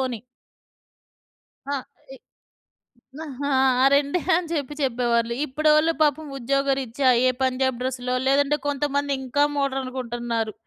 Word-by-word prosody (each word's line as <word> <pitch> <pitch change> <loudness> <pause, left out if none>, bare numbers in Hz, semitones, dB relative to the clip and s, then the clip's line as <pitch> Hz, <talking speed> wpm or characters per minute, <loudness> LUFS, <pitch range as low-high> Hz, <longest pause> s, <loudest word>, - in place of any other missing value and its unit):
ఓణి. 255 -3 -2 1.5
ఆహ్, 275 -3 -2 0.3
ఇ - - -9 1.0
న - - -7 0.3
ఆ 260 -1 +3
రెండే 285 +5 +1 0.2
అని 350 -2 -2
చెప్పి 295 -1 -3
చెప్పేవాళ్ళు. 235 -2 0
ఇప్పుడోళ్ళు 305 +3 +3
పాపం 305 +1 +1
ఉద్యోగరీత్యా 270 0 0 0.2
ఏ - - +5
పంజాబ్ 260 -1 0
డ్రెస్లో, 250 -1 -2
లేదంటే 285 +2 +3
కొంతమంది 285 0 -1
ఇంకా 265 +3 +1
మోడర్న్‌గుంటన్నారు. 245 -5 -2
265 Hz, 105 wpm, -23 LUFS, 250-285 Hz, 1.5 s, ఏ